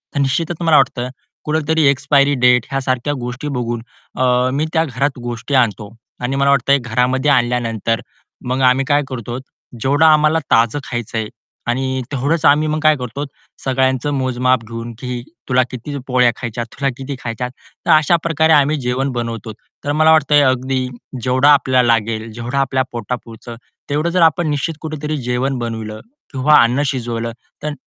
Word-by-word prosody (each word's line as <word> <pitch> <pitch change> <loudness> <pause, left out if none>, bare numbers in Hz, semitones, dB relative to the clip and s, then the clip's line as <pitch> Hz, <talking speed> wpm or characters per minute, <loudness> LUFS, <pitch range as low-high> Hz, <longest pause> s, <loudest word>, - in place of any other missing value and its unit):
तर - - 0
निश्चितच 155 +5 -1
मला 165 -2 +4
वाटतं 125 0 +1 0.4
कुठेतरी 155 0 +1
एक्सपायरी 140 +1 +3
डेट 125 -2 +5
ह्यासारख्या 130 +1 -1
गोष्टी 125 +4 -5
बघून 120 -1 -3 0.3
अ, 125 0 +2
मी 150 +3 0
त्या 160 - +3
घरात 135 0 -2
गोष्टी 120 +3 -5
आणतो. 110 -4 +1 0.3
आणि 130 +2 -1
मला 140 0 +3
वाटतं 140 0 +3
घरामध्ये 125 +4 +1
आणल्यानंतर 120 -3 0 0.5
मग 130 +1 0
आम्ही 130 +1 +3
काय 145 0 +4
करतो 120 -1 -5 0.4
जेवढं 145 +4 +3
आम्हाला 155 0 +5
ताजं 115 +5 +3
खायचंय 115 -3 -4 0.4
आणि 130 +1 -1
तेवढंच 145 +4 0
आम्ही 150 +2 +4
मग 155 +1 -1
काय 155 -1 +5
करतो 125 +3 -5 0.4
सगळ्यांचं 130 +1 +1
मोजमाप 130 -2 +1
घेऊन, 115 +1 -7
की 125 -1 -4 0.3
"तुला 130 0 +4
किती 130 +4 -6
पोळ्या 125 -2 +3
खायच्यात, 120 -1 -4
तुला 140 -1 -1
किती 135 +1 -5
खायच्या?" 120 +1 -3
तर 125 - -6
अशा 155 +2 +5
प्रकारे 160 -1 +3
आम्ही 150 +1 +4
जेवण 130 +3 -1
बनवतो. 115 -2 -4 0.3
तर 145 - 0
मला 155 +1 +4
वाटतं 150 -2 +4
अगदी 130 0 -1 0.4
जेवढा 130 +3 +4
आपल्याला 130 -3 +3
लागेल, 115 -1 0
जेवढं 120 +4 -4
आपल्या 130 -1 +1
पोटापुरत 120 0 -6 0.4
तेवढं 150 +4 0
जर 180 0 +1
आपण 165 +1 +3
निश्चित 145 +3 -2
कुठेतरी 155 -1 -4
जेवण 125 +2 0
बनवलं 110 -2 -5 0.3
किंवा 140 +3 +4
अन्न 120 +4 +1
शिजवलं 115 -3 -3 0.3
तर 150 -1 -2
130 Hz, 155 wpm, -18 LUFS, 120-145 Hz, 0.5 s, डेट